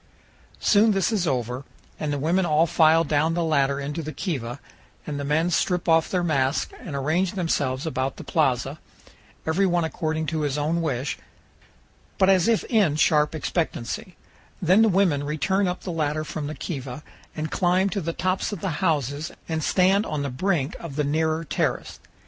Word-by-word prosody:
Soon 215 +1 +4
this 195 +1 +1
is 195 -6 0
over, 125 -1 -2 0.4
and 150 -1 -2
the 145 - -1
women 170 +7 +1
all 160 -1 +3
file 160 0 +4
down 155 +2 +1
the 175 - 0
ladder 140 -3 +1
into 145 +3 -4
the 155 0 -5
kiva 135 - -4 0.5
and 145 -2 -4
the - - -3
men 155 +5 +1
strip 180 +1 0
off 160 -1 +4
their 180 -2 0
masks 140 -4 0
and 150 - -7
arrange 160 +7 0
themselves 145 -7 -1
about 135 -4 -2
the - - -8
plaza, 135 -1 0 0.7
every 180 +5 +2
one 175 -1 +1
according 160 0 -2
to 155 +1 -2
his 145 -1 -1
own 160 +3 0
wish, 135 -4 -2 1.0
but 190 0 +5
as 185 -1 +3
if 230 -2 +2
in 205 - +2
sharp 150 0 +3
expectancy; 160 +1 -3 0.4
then 185 +4 +4
the 225 - +5
women 175 -7 +2
return 190 +7 0
up 180 0 -3
the 185 - -4
ladder 155 -1 -1
from 155 -1 -5
the 155 - -5
kiva 135 -1 -6 0.3
and 155 0 -4
climb 185 +1 +2
to 200 0 -2
the 165 0 -2
tops 185 +4 -1
of 205 - -5
the 190 - -2
houses 145 0 0 0.2
and 160 -1 -2
stand 190 +4 +3
on 150 -2 -2
the 140 - -3
brink 150 0 -1
of 165 -5 -7
the 150 - +1
nearer 160 +2 0
terrace. 160 - -2
160 Hz, 185 wpm, -24 LUFS, 145-180 Hz, 1.0 s, but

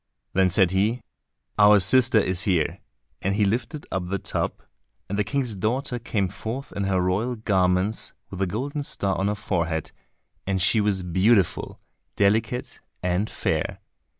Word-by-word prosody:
Then 95 0 +3
said 95 -1 +3
he, 105 +6 +1 0.6
"Our 105 0 +7
sister 115 +5 +5
is 95 -3 +2
here," 90 -6 +1 0.4
and 95 +1 0
he 105 0 +3
lifted 125 +9 -2
up 95 -2 -2
the 100 +2 -1
tub, - - -3 0.4
and 100 - -3
the 105 - +1
King's 130 -3 -2
daughter 125 +6 -1
came 105 -4 -1
forth 115 +8 -6
in 100 - -3
her 95 -1 +1
royal 100 +7 0
garments 95 -1 +1 0.2
with 95 - -7
the 95 - +1
golden 135 +10 -3
star 100 -8 -1
on 95 - 0
her 105 - 0
forehead, 85 -6 -2 0.6
and 95 -1 0
she 105 +4 +3
was 100 -3 0
beautiful, 95 +3 +1 0.4
delicate 110 +4 0 0.2
and 90 +4 0
fair. - - -2
100 Hz, 155 wpm, -24 LUFS, 95-110 Hz, 0.6 s, Our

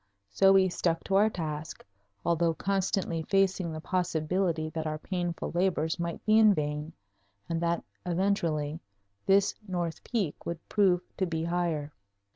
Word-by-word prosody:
So 195 - +5
we 190 -1 +5
stuck 170 -2 -1
to 195 - -1
our 210 +2 +5
task, 155 -5 -5 0.4
although 170 -1 +2
constantly 195 -3 0
facing 190 -1 +1
the 155 - -5
possibility 170 -1 0
that 160 0 -3
our 155 0 -2
painful 175 0 -3
labors 175 -2 +1
might 170 -1 -4
be 215 +1 +5
in 215 -2 +6
vain 150 +1 -3 0.5
and 165 0 -2
that 170 0 0 0.2
eventually, 170 -5 0 0.5
this 195 0 +4
north 175 -3 -3
peak 205 -11 -2
would 170 -1 -6
prove 190 -4 +3 0.2
to 190 - 0
be 160 -1 -2
higher. 165 -4 -1
170 Hz, 145 wpm, -29 LUFS, 160-190 Hz, 0.5 s, in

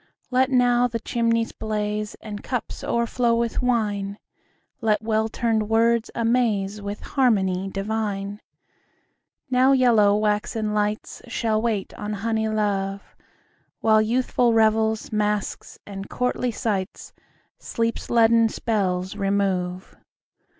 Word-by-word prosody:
Let 260 +1 +3
now 245 -1 +3
the 230 -1 -4
chimneys 230 0 0
blaze 210 -1 -3
5 - - -10
And 205 -1 -6
cups 250 -3 -4
o'erflow 235 0 +1
with 235 +1 -1
wine; 205 -5 0 0.6
Let 215 -2 +1
well 220 0 0
tuned 220 -2 0
words 230 +1 +2
amaze 225 -4 0
With 205 +1 -5
harmony 195 -8 +1
divine. 205 0 -3 1.1
Now 260 +2 +5
yellow 225 -6 +4
waxen 210 0 -1
lights 210 0 -2
Shall 225 -2 0
wait 220 -4 -2
on 210 0 -3
honey 220 +1 -1
love, 200 -2 -2
10 - - -33 0.5
While 220 -1 +5
youthful 240 +1 +1
revels, 220 0 +2
masques, 210 -1 -2
and 195 -1 -8
courtly 250 0 -1
sights 205 -4 -3 0.5
Sleep's 230 0 -3
leaden 230 -1 +4
spells 190 -5 -1
remove. 195 -2 -1
220 Hz, 115 wpm, -23 LUFS, 205-230 Hz, 1.1 s, Now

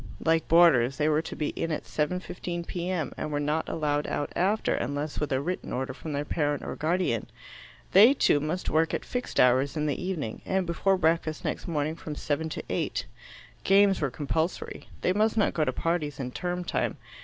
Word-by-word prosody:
Like 165 -1 +2
boarders, 135 -7 +5
they 150 - +2
were 155 0 +3
to - - -7
be 150 - -1
in 165 - -3
at 155 - -2
7:15 175 +1 -3
P.M., 175 -5 -2
and 155 - -4
were 145 - 0
not 150 +2 -1
allowed 150 -2 0
out 145 - -3
after 205 +5 +1
unless 145 +4 -2
with 150 - -2
a 130 - +2
written 180 +6 -4
order 130 +2 -2
from 155 - -7
their 145 0 -2
parent 145 -2 -1
or - - -4
guardian; 160 - 0 0.6
they, 225 +9 +8
too, 145 - +3
must 155 +5 -3
work 160 +1 +2
at - - -4
fixed 250 0 -3
hours 130 +4 +4
in 150 - 0
the 145 +3 -2
evening, 160 -12 -3
and 190 -1 0
before 190 +3 +1
breakfast 160 -2 0
next - - -3
morning 155 -1 -1
from 155 -2 -7
7 155 +2 -2
to - - -5
8. - - -2 0.6
Games 195 -1 +4
were 145 - +1
compulsory. 160 +7 -3
They 185 - +2
must 215 +2 +2
not 210 - +3
go 155 - +1
to - - +1
parties 155 -4 -2
in 125 -2 -3
term 180 +5 -3
time. - - -1
160 Hz, 200 wpm, -28 LUFS, 145-180 Hz, 0.6 s, they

